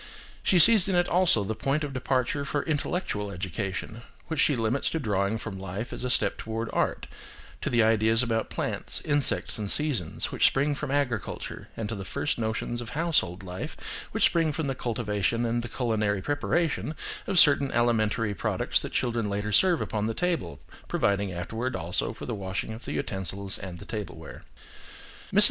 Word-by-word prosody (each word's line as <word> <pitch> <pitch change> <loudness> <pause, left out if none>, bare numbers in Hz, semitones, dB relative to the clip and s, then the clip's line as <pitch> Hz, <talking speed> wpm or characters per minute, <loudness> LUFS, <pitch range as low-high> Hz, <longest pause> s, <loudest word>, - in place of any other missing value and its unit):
She 185 - +3
sees 200 +1 +7
in 190 - +1
it 175 0 +3
also 175 - +4
the 105 +3 -2
point 140 +7 -1
of 145 -2 -4
departure 130 +2 0
for 145 0 -1
intellectual 145 - -2
education, 95 +4 -4 0.3
which 160 -2 -2
she 145 - +4
limits 115 +3 0
to 165 - -2
drawing 100 -4 0
from 105 -3 -6
life 95 +5 -5
as - - -4
a 125 - -1
step - - +2
toward 115 +1 -4
art, - - 0 0.6
to - - -1
the 120 -2 +4
ideas 110 +1 +4
about 115 -2 -1
plants, - - 0
insects, 145 -6 +2
and 105 -2 -2
seasons, 135 - +1
which - - +4
spring 145 +2 +1
from 145 0 -4
agriculture, 130 -8 -2
and 110 - -3
to 115 - -4
the 100 -3 -5
first 120 +7 -2
notions 115 +1 -2
of 120 - -7
household 140 - 0
life, 90 0 -6 0.3
which - - 0
spring 165 -2 +2
from 155 +1 -2
the 135 - -1
cultivation 115 -2 -1
and 120 +1 0
the 120 - -6
culinary 105 -6 0
preparation 150 +2 0 0.3
of 195 - 0
certain 140 -3 +6
alimentary 115 -2 +1
products - - 0
that - - -6
children 115 -4 0
later 105 +1 -2
serve 175 - +4
upon 105 0 -1
the 115 - -2
table, 165 - -1 0.3
providing 100 -1 +1
afterwards 115 +8 -3
also 90 +3 -2
for 110 - -8
the 120 - -3
washing 100 +1 -3
of 115 - -10
the - - -4
utensils 95 0 -2
and 95 +2 -8
tableware. 105 -3 -7 0.9
Mrs. - - +4
115 Hz, 180 wpm, -27 LUFS, 100-140 Hz, 0.9 s, sees